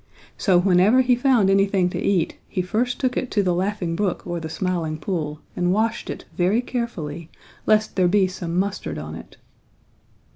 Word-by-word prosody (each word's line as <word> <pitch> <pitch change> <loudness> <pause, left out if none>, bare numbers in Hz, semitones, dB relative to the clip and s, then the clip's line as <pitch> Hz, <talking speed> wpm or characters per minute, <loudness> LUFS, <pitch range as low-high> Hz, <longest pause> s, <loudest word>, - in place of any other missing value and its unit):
So 185 -3 +3
whenever 190 +7 +5
he 250 -1 +3
found 245 -5 +3
anything 195 -1 +3
to - - -3
eat 185 -5 +1
he 185 - -1
first 235 +7 -1
took 255 -1 0
it 255 - -2
to 205 - +1
the 180 -2 +1
Laughing 185 -2 -1
Brook 190 0 -1
or 175 -1 -3
the 160 -1 -6
Smiling 170 -3 -2
Pool 155 -2 -3
and 175 0 +1
washed 220 +3 0
it - - -6
very 185 +6 +2
carefully, 170 - -4 0.4
lest 215 0 +3
there 185 -2 +3
be 195 +1 +4
some 180 -2 -4
mustard 200 +2 -2
on - - -6
it. - - -11
190 Hz, 180 wpm, -23 LUFS, 175-215 Hz, 0.4 s, whenever